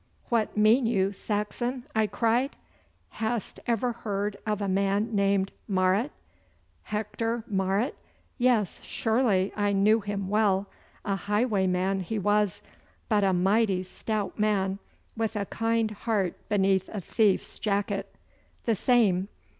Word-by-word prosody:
'What 225 -3 0
mean 225 +4 +5
you, 195 -4 +2
Saxon?' 220 +5 -3
I 220 -1 +3
cried. 240 +6 +1 0.5
'Hast 225 -1 -3
ever 240 +1 +1
heard 205 -3 -3
of 210 -1 0
a 200 - -1
man 200 +4 +1
named 195 -1 +2 0.2
Marot?' 190 +6 +2 0.7
'Hector 220 +2 -3
Marot! 195 +3 0 0.5
Yes, 240 -6 +2
surely 220 -5 +1
I 205 -1 +1
knew 210 +3 +4
him 200 -2 -3
well. 200 -1 +2 0.4
A 200 - 0
highwayman 195 -3 +1
he 205 +4 -3
was, 205 -1 +1 0.5
but 210 -3 +3
a 195 - +3
mighty 190 +1 +2
stout 210 +3 -4
man 200 -2 +1 0.4
with 225 0 -2
a 205 -1 -1
kind 225 +1 0
heart 205 -4 -1 0.2
beneath 195 -2 +2
a 210 - -4
thief's 200 +1 +1
jacket.' 200 -1 -1 0.5
'The 230 - +2
same. 200 -5 +3
210 Hz, 125 wpm, -27 LUFS, 195-225 Hz, 0.7 s, mean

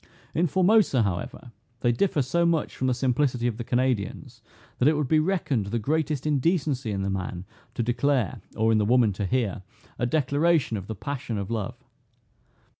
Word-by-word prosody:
In 175 +3 +2
Formosa, 185 - +3
however, 100 +5 -4 0.3
they 120 - +3
differ 145 +3 +1
so 170 +7 +1
much 170 -2 +1
from 130 - -1
the 130 - +2
simplicity 125 -1 0
of 120 -3 0
the 120 - -4
Canadians, 125 0 -2 0.4
that 125 - +4
it 155 0 +4
would 150 -3 0
be 155 +3 +4
reckoned 155 - 0
the 115 +4 -1
greatest 150 +4 -1
indecency 145 -4 0
in 100 -2 -2
the 100 - -1
man 95 -1 -4 0.3
to 120 - 0
declare, 120 -2 0 0.2
or 110 +1 +3
in 110 - +3
the - - +2
woman 120 -2 +3
to 100 +1 -3
hear, 115 -5 -1 0.4
a 120 - +1
declaration 145 0 +2
of 100 -2 -6
the 110 - -5
passion 125 0 -4
of 100 +2 -4
love. 110 -4 -3
125 Hz, 185 wpm, -26 LUFS, 110-150 Hz, 0.4 s, that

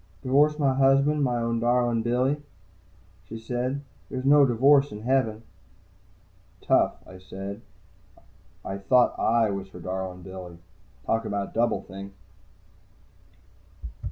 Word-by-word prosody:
"I 90 +7 -32
divorced 145 +3 +3
my 140 -3 +2
husband, 140 +2 +3
my 125 -2 0
own 115 0 -1
darlin' 120 -1 +1
Billy," 125 +5 0 0.9
she 115 - -6
said. 125 +4 -3 0.3
"There's 130 0 -5
no 140 0 +6
divorce 135 +4 +4
in 105 - -8
Heaven." 115 -4 0 1.2
"Tough," - - +2
I 95 - -13
said. 95 +3 -8 1.0
I 95 +1 -5
thought 120 +6 +3
I 115 -2 +2
was 100 -1 -5
her 90 - -12
darlin' 90 0 -5
Billy. 90 -2 -9 0.5
Talk 115 0 0
about 100 -1 -3
Double 115 0 0
think! 100 +1 -10
115 Hz, 125 wpm, -26 LUFS, 100-135 Hz, 1.2 s, no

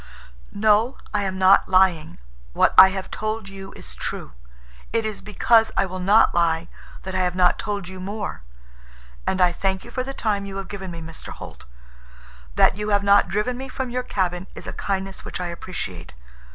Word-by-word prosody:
"No, 215 +4 +2 0.2
I 210 - +1
am 190 -1 -3
not 190 +1 +5
lying. 185 -4 +3 0.4
What - - +3
I 190 - +11
have 190 0 -5
told 215 -1 -3
you 195 0 -9
is 60 - -9
true. - - -5 0.6
It 225 -1 0
is 215 -2 -4
because 225 +2 +3
I - - +3
will 185 0 -6
not 205 +5 +4
lie 170 -1 +1 0.3
that 190 - -6
I 185 - 0
have 180 -1 0
not 180 -1 +3
told 205 -3 -3
you 190 0 -8
more. 200 - -5 0.9
And 190 - 0
I 180 -1 +5
thank 190 +1 -2
you - - -11
for 255 - -2
the 270 - -5
time 200 -3 -1
you 195 0 -6
have 195 - -6
given 190 -2 -6
me, 170 -1 -7
Mr. 165 0 -9
Holt. - - -10 0.9
That - - +4
you 210 0 -3
have 200 -1 +2
not 200 -1 +5
driven 210 +7 -1
me 265 +1 -7
from 255 -1 -4
your 250 +1 -1
cabin 185 -5 -2
is - - -8
a - - -6
kindness 195 -1 -3
which - - -6
I 180 -1 -3
appreciate. 165 - -7
195 Hz, 195 wpm, -23 LUFS, 185-210 Hz, 0.9 s, I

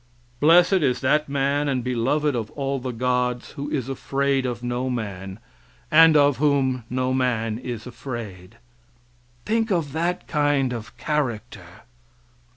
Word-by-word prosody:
"Blessed 175 +5 +5
is 130 -4 +1
that 150 +3 +2
man, 140 +1 0
and 130 -3 -1
beloved 125 +4 0
of 110 -3 -3
all 140 -1 -2
the 130 0 -5
gods 125 0 -1
who 145 +1 -6
is 130 -4 -2
afraid 135 0 -1
of 120 -1 -5
no 125 +1 -2
man, 100 -5 -5 0.5
and 160 0 +7
of 145 -3 +4
whom 135 -3 +1
no 130 +1 -1
man 115 -4 0
is 120 -3 -6
afraid." 115 -6 -8 0.9
Think 225 +1 0
of 165 -7 0
that 170 +4 -2
kind 145 -4 +1
of 115 -3 -8
character! 115 - -3
130 Hz, 140 wpm, -23 LUFS, 120-145 Hz, 0.9 s, and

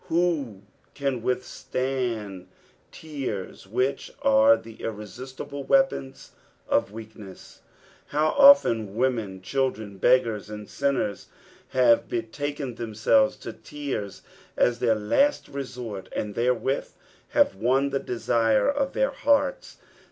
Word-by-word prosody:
Who 155 - 0 0.3
can 135 -4 -2
withstand 125 -5 -3 0.4
tears, 135 -13 -6
which 125 +6 -1
are 275 0 +6
tlie 115 -1 -13
irresistible 130 +6 -7
weapons 270 - 0 0.4
of - - +1
weakness? 105 -3 -11 0.5
How 150 +2 +1
often 155 - +6
women, 115 -7 -1
children, 110 -6 -2
beggars, 115 -4 +2
and 105 -1 -8
sinners, 135 -7 -1 0.4
have 125 -3 +3
betaken 130 +3 -4
themselves 115 - +2
to - - -5
tears 140 -9 -6 0.3
as 120 -1 +2
their 115 -2 +3
last 195 - +1
reaort. 125 -7 -6
and 105 -1 -3
therewith 125 +4 0 0.5
have - - +5
won 130 +7 +1
the 135 - 0
desire 115 -2 +1
of 280 -1 0
their 270 +1 +1
hearts 290 - 0
125 Hz, 105 wpm, -25 LUFS, 110-145 Hz, 0.5 s, are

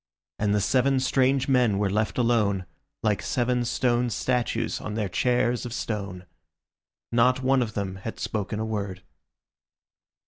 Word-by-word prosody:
And 105 -1 +2
the - - +3
seven 130 +5 +2
strange 130 0 +2
men 125 -7 +3
were 100 0 +1
left 105 +3 -1
alone, 105 -6 +2 0.4
like 105 -2 +1
seven 125 0 0
stone 120 0 +1
statues 125 +2 -1
on 105 - -5
their 105 -2 -1
chairs 125 +4 +1
of 120 -2 -5
stone. 100 -6 -4 0.9
Not 125 +2 +3
one 130 0 +3
of 110 -3 -3
them 95 -2 -3
had 110 +4 -6
spoken 105 0 -3
a 110 - -1
word. 100 -4 -4
115 Hz, 145 wpm, -26 LUFS, 105-125 Hz, 0.9 s, the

